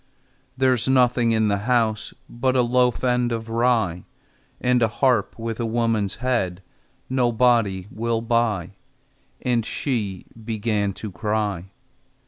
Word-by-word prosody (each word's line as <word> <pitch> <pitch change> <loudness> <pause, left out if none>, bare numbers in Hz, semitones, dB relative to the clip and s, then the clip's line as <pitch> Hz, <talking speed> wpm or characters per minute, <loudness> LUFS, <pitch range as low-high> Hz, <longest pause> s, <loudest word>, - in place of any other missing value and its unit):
"There's 130 -3 +2
nothing 125 -2 +3
in 110 -1 +2
the 100 -1 +1
house 110 -3 +1 0.2
But 130 +2 -1
a 125 - +4
loaf 125 +1 +1
end 125 -1 +1
of 115 -1 -4
rye, 115 -7 +1 0.5
And 125 -1 +2
a 115 - +4
harp 120 -1 +1
with 115 0 -4
a 120 - -1
woman's 115 -3 0
head 115 -8 -1 0.4
Nobody 120 -6 +2
will 115 0 -1
buy," 115 -7 0 0.7
And 120 -2 +1
she 105 -7 -3 0.2
began 105 -2 -1
to 105 +1 -7
cry. 105 -1 -2
115 Hz, 125 wpm, -23 LUFS, 105-125 Hz, 0.7 s, a